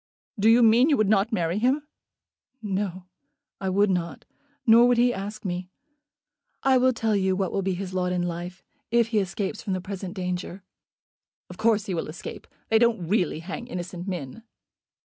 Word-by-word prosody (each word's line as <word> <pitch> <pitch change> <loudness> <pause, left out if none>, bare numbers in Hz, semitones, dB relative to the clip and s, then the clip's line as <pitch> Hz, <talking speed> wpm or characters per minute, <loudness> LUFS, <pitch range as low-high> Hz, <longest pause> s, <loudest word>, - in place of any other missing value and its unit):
"Do 215 +3 +5
you 235 +1 +6
mean 230 +6 +5
you 290 - +3
would 215 -2 +2
not 205 +1 +2
marry 175 -2 0
him?" 270 +6 +1 0.7
"No; 195 -4 -3 0.5
I 190 - -2
would 200 +1 +3
not. 170 -3 -3 0.4
Nor 235 +1 +7
would 245 -1 +3
he 245 +1 +4
ask 205 +2 -6
me. 180 0 -3 0.9
I 265 -1 +4
will 255 +1 +4
tell 225 -3 0
you 190 -1 +1
what 190 -1 -1
will 195 - -1
be 190 -1 -1
his 185 0 -6
lot 180 -1 0
in 180 -1 0
life, 175 +1 -5 0.3
if 235 0 +2
he 220 -2 +2
escapes 195 +2 -3
from 200 - -3
the 185 - -1
present 190 0 -6
danger." 180 0 -4 0.9
"Of - - -11
course 220 -1 +2
he 195 - -3
will 165 - -2
escape. 155 +2 -8 0.2
They 225 - +4
don't 230 -7 +2
really 180 -6 +1
hang 195 +7 -6
innocent 180 -3 -6
men." 175 - -5
195 Hz, 185 wpm, -25 LUFS, 180-225 Hz, 0.9 s, Nor